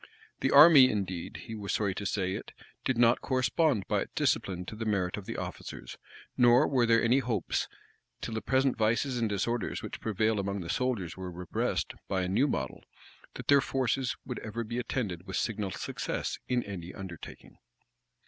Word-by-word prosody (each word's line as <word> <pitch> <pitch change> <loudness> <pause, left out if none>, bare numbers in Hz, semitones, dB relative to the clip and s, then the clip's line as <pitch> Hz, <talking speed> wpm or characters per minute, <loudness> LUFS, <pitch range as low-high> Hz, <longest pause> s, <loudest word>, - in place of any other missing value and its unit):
The 135 - +1
army, 145 -2 +9
indeed, 95 -5 -3
he 115 - -7
was 105 -2 -4
sorry 100 -3 0
to 100 +1 -3
say 95 -2 -1
it, - - -7 0.3
did 130 - 0
not 120 0 +4
correspond 130 - +1
by - - +1
its - - -6
discipline 90 -2 0
to 110 - -7
the 110 - -4
merit 100 -5 0
of 100 -2 -8
the - - -4
officers; - - -7 0.4
nor 120 +3 +5
were 125 -4 +2
there 115 0 +4
any 120 +3 +4
hopes, 115 -7 -1 0.5
till 115 - -5
the 110 - -2
present 130 +2 +2
vices 120 +4 +1
and 115 -2 +1
disorders 105 +2 -2
which - - -7
prevail 110 0 +1
among 100 0 -2
the 85 - -4
soldiers 110 -10 -1
were 95 -1 -6
repressed 90 +1 -2
by 95 -1 0
a - - -1
new 105 +10 +2
model 65 - -3 0.5
that - - -8
their 140 -1 +6
forces 130 -1 0
would 125 - -5
ever 115 +2 -4
be 120 +2 -4
attended 100 -8 -3
with 95 - -3
signal 105 -3 -1
success - - -4
in 125 -1 +1
any 95 -3 -7
undertaking. 95 -5 -10
110 Hz, 185 wpm, -30 LUFS, 95-125 Hz, 0.5 s, army